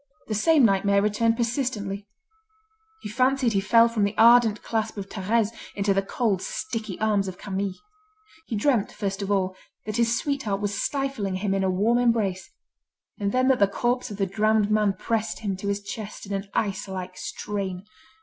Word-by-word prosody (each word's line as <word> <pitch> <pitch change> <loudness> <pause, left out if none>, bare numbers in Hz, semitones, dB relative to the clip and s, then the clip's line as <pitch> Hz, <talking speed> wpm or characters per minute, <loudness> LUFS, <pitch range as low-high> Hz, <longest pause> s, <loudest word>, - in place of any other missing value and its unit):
The 220 - -3
same 290 +5 +4
nightmare 200 -1 +3
returned 220 +3 +1
persistently: 225 -5 -2 1.0
he - - -4
fancied 255 +1 +2
he 195 - +2
fell 230 +3 +5
from 230 -3 -1
the 200 +1 0
ardent 230 -1 +6
clasp 220 -1 -2
of 195 -1 -5
Thérèse 215 +2 0 0.3
into 200 0 +1
the 195 - +2
cold, 195 -1 -1
sticky 225 - -4
arms 210 -2 +1
of 185 -1 -6
Camille. 195 -1 -3 0.7
He 225 - -3
dreamt, 225 -1 +1
first 200 -1 -3
of 200 0 -2
all, 190 -2 +1 0.3
that 215 +1 -3
his 235 0 +2
sweetheart 270 -10 -2
was 205 0 -2
stifling 270 -9 -2
him 195 +1 -1
in 195 0 0
a 190 - +2
warm 215 +6 +2
embrace, 220 -6 +1 0.7
and 200 -1 0
then 255 +2 +2
that 265 - +3
the 200 - +5
corpse 240 +5 -1
of 205 - -7
the 195 - +1
drowned 215 +2 +1
man 210 -2 +3
pressed 225 +4 -2
him 200 -3 -2
to 200 - -5
his 200 0 -1
chest 210 +1 -7
in 200 - -5
an 195 0 -4
ice 200 -2 -1
like 185 -1 -6
strain. 195 -3 -4
210 Hz, 185 wpm, -25 LUFS, 195-230 Hz, 1.0 s, ardent